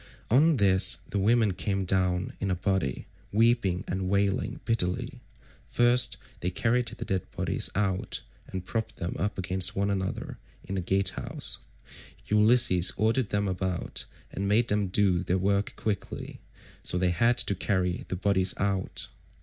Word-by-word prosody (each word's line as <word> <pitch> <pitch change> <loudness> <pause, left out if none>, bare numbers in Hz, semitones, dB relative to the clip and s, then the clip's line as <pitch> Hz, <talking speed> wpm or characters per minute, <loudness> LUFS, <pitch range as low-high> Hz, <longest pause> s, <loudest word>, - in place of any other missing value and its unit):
On 150 +5 +5
this 95 -3 +4
the 100 - 0
women 110 0 +3
came 100 +1 -2
down 90 -1 0
in 95 - -1
a 90 - +1
body, 90 -7 -1 0.3
weeping 110 -4 +2
and 95 0 -2
wailing 100 0 0
bitterly. 90 -6 -1 0.5
First 120 +1 +2 0.2
they 90 - -1
carried 120 +5 +1
the - - -6
dead 95 -2 -2
bodies - - -1
out, 95 -2 -1 0.2
and 95 -1 -6
propped 110 +3 -3
them 85 - -4
up 100 +4 -1
against 95 +2 +1
one 100 +1 +1
another 95 -1 -3 0.2
in 95 - -6
the 95 - -1
gatehouse. 95 +1 -1 0.7
Ulysses 105 -4 +4
ordered 110 +2 +1
them 100 0 0
about 95 -1 -3 0.3
and 100 - -3
made 110 +3 +3
them 105 -1 +1
do 95 -2 +2
their 90 0 0
work 100 +2 0
quickly, 105 -4 -4 0.4
so - - -1
they 90 0 +2
had 115 +8 +2
to 100 - +1
carry 90 -2 -1
the - - -3
bodies 95 0 +1
out. 95 -1 -2
95 Hz, 150 wpm, -28 LUFS, 95-105 Hz, 0.7 s, On